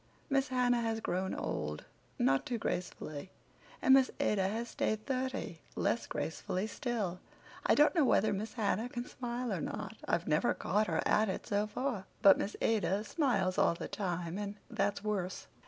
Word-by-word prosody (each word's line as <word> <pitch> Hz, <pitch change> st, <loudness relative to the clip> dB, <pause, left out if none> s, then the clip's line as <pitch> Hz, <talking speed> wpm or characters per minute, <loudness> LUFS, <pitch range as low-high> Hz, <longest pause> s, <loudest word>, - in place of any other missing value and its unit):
Miss 275 Hz, 0 st, +3 dB
Hannah 245 Hz, -2 st, +2 dB
has 225 Hz, -1 st, -1 dB
grown 190 Hz, -2 st, -1 dB
old, 75 Hz, 0 st, -3 dB, 0.3 s
not 135 Hz, +2 st, +3 dB
too 245 Hz, -, -2 dB
gracefully, 175 Hz, -5 st, -4 dB, 0.5 s
and 265 Hz, -, +7 dB
Miss 265 Hz, -1 st, +6 dB
Ada 195 Hz, -3 st, +2 dB
has 225 Hz, +4 st, -2 dB
stayed 215 Hz, -2 st, -1 dB
thirty, 260 Hz, 0 st, -2 dB
less -, -, 0 dB
gracefully 185 Hz, +3 st, -2 dB
still. 215 Hz, -5 st, -2 dB, 0.5 s
I -, -, +6 dB
don't 295 Hz, -, +5 dB
know 330 Hz, -5 st, +4 dB
whether 215 Hz, -5 st, +3 dB
Miss 210 Hz, +3 st, -4 dB
Hannah 220 Hz, +1 st, 0 dB
can 240 Hz, 0 st, -4 dB
smile 245 Hz, -1 st, -3 dB
or -, -, -2 dB
not; -, -, -5 dB
I've -, -, 0 dB
never -, -, +2 dB
caught 210 Hz, +1 st, +1 dB
her -, -, 0 dB
at 215 Hz, -1 st, +3 dB
it 190 Hz, -, -3 dB
so 205 Hz, +1 st, +1 dB
far, 220 Hz, -2 st, -2 dB, 0.2 s
but 195 Hz, -1 st, +8 dB
Miss 205 Hz, -, -2 dB
Ada 210 Hz, -2 st, +2 dB
smiles 215 Hz, -, +1 dB
all -, -, +4 dB
the -, -, -5 dB
time 180 Hz, -2 st, -3 dB
and 205 Hz, 0 st, -4 dB, 0.2 s
that's 200 Hz, +1 st, 0 dB
worse. 195 Hz, -4 st, -2 dB
215 Hz, 170 wpm, -33 LUFS, 190-245 Hz, 0.5 s, but